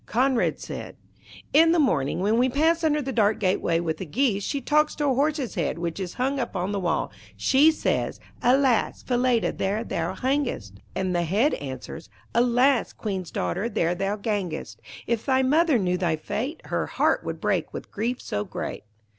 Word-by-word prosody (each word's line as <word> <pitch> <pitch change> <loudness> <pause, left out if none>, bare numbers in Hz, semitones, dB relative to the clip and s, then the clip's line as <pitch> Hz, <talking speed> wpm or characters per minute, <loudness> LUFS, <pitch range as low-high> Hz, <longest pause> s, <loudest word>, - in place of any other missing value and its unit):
Conrad 255 +1 +1
said, - - -7 0.6
'In 325 +3 +6
the - - +3
morning, 165 - +1
when 215 +4 +2
we 255 +1 +3
pass 325 +5 +2
under 300 -2 +2
the 265 - -3
dark 220 -2 +2
gateway 185 -4 +1
with 160 -2 -2
the 190 - -5
geese, 210 - +1
she 280 - -2
talks 300 +3 +2
to 295 - -1
a 270 - +3
horse's 285 -1 0
head 170 -6 -1
which 170 +1 -3
is 185 -2 -5
hung 270 +2 0
up 235 -5 -3
on 185 +2 -1
the 200 - -1
wall. 175 -4 -1 0.3
She 285 +4 +5
says 315 - -1 0.2
'Alas! 255 -1 +2
Falada, 245 -2 +1
there 205 +4 -1
thou - - -3
hangest,' 255 - -2 0.2
and 185 -1 -1
the 175 - +2
Head 205 - +2
answers 135 +4 -7 0.2
'Alas! 245 +2 +3
Queen's 190 -5 -4
daughter, 200 +6 -2
there 170 -5 +1
thou 195 +3 -1
gangest. 195 - -3 0.3
If 230 -1 -1
thy 265 -1 +2
mother 305 +1 +3
knew 180 -3 0
thy 170 -4 +1
fate, 250 - -4
Her - - -2
heart - - +1
would - - -5
break - - 0
with - - -8
grief 235 +4 -2
so 105 - -2
great.' - - -6
230 Hz, 185 wpm, -25 LUFS, 180-270 Hz, 0.6 s, In